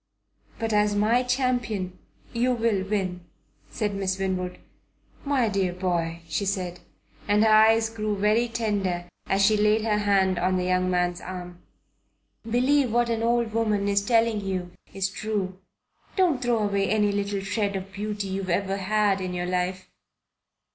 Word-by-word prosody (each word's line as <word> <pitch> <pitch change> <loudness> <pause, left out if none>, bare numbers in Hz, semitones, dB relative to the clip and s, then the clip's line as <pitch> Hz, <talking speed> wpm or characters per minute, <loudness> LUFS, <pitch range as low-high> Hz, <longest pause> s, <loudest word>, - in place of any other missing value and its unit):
"But 225 -1 -2
as 210 0 +3
my 220 +4 +3
champion 245 -8 -1 0.3
you 245 +2 +2
will 225 -5 +1
win," 190 -3 -2 0.5
said 210 -2 -2
Miss 190 -1 -1
Winwood. 185 -2 -2 0.7
"My 275 -5 +1
dear 195 -3 0
boy," 170 -2 -2
she 165 +5 -1
said, 185 -3 -2 0.5
and 210 +1 +4
her 220 - +4
eyes 220 +1 +5
grew 215 -2 -2
very 215 +4 +2
tender 200 -6 -2 0.2
as 195 0 +3
she 215 +2 +4
laid 210 +1 +3
her 210 -2 +1
hand 195 -3 +2
on 185 +1 +1
the 180 - 0
young 185 0 +1
man's 180 -1 0
arm, 180 -1 -8 0.9
"believe 255 +2 +2
what 240 0 +2
an 225 -1 -1
old 235 -1 +1
woman 215 -3 +1
is 200 0 +2
telling 225 -1 +2
you 185 -2 -3 0.2
is 195 0 -1
true. 190 -2 -3 0.6
Don't 345 -9 +2
throw 240 -3 +1
away 200 -1 0
any 210 -1 +2
little 200 0 -2
shred 200 0 -1
of 190 0 -6
beauty 205 0 -3
you've 190 0 -3
ever 195 +2 0
had 200 0 +1
in 180 -1 -3
your 175 0 -2
life. 180 +1 -2
205 Hz, 160 wpm, -25 LUFS, 185-225 Hz, 0.9 s, eyes